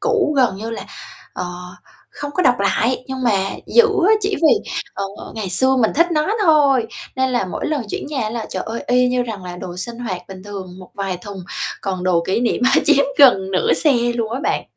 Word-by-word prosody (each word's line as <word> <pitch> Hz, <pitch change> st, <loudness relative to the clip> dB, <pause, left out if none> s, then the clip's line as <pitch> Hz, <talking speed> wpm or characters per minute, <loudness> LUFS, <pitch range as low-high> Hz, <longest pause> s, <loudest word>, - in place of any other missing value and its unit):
cũ 445 Hz, -9 st, +1 dB
gần 250 Hz, -7 st, +3 dB
như 220 Hz, +3 st, -5 dB
là, 230 Hz, -, -6 dB, 0.5 s
ờ, -, -, -4 dB, 0.7 s
không 290 Hz, -, -6 dB
có 365 Hz, -, +1 dB
đọc 255 Hz, -5 st, +5 dB
lại, 225 Hz, +6 st, +1 dB
nhưng 265 Hz, -1 st, -5 dB
mà 195 Hz, -5 st, +2 dB, 0.2 s
giữ 475 Hz, -1 st, +5 dB, 0.2 s
á, -, -, +6 dB
chỉ 400 Hz, -1 st, -1 dB
vì, 330 Hz, +7 st, +3 dB, 0.2 s
ờ, 200 Hz, -, -3 dB, 0.3 s
ngày 215 Hz, -3 st, -4 dB
xưa 260 Hz, +7 st, +4 dB
mình 225 Hz, -4 st, +3 dB
thích 335 Hz, +4 st, +4 dB
nó 310 Hz, +6 st, +1 dB
thôi. 285 Hz, -, +4 dB, 0.3 s
Nên 260 Hz, 0 st, +1 dB
là 245 Hz, -5 st, 0 dB
mỗi 180 Hz, -, -4 dB
lần 300 Hz, -4 st, -1 dB
chuyển -, -, -4 dB
nhà 265 Hz, -7 st, -2 dB
là, 230 Hz, -1 st, -4 dB
trời -, -, -3 dB
ơi, 225 Hz, +1 st, -4 dB
y 250 Hz, 0 st, +3 dB
như 250 Hz, 0 st, +1 dB
rằng 215 Hz, -6 st, -6 dB
là 180 Hz, 0 st, -7 dB
đồ 180 Hz, 0 st, -7 dB
sinh 235 Hz, +5 st, -6 dB
hoạt 190 Hz, -7 st, -4 dB
bình 190 Hz, -1 st, -10 dB
thường 190 Hz, -3 st, -8 dB
một 185 Hz, -, -13 dB
vài 195 Hz, -2 st, -3 dB
thùng, 190 Hz, 0 st, -9 dB, 0.4 s
còn 185 Hz, -2 st, -3 dB
đồ 175 Hz, -2 st, +2 dB
kỷ 190 Hz, +4 st, 0 dB
niệm, 240 Hz, 0 st, 0 dB
ơ, -, -, +5 dB
chiếm 280 Hz, -, +4 dB
gần 195 Hz, -9 st, +6 dB
nửa 185 Hz, -, +2 dB
xe 300 Hz, -, +4 dB, 0.2 s
luôn 230 Hz, -2 st, -2 dB
á 255 Hz, -, -3 dB
bạn. -, -, 0 dB
235 Hz, 225 wpm, -19 LUFS, 195-270 Hz, 0.7 s, á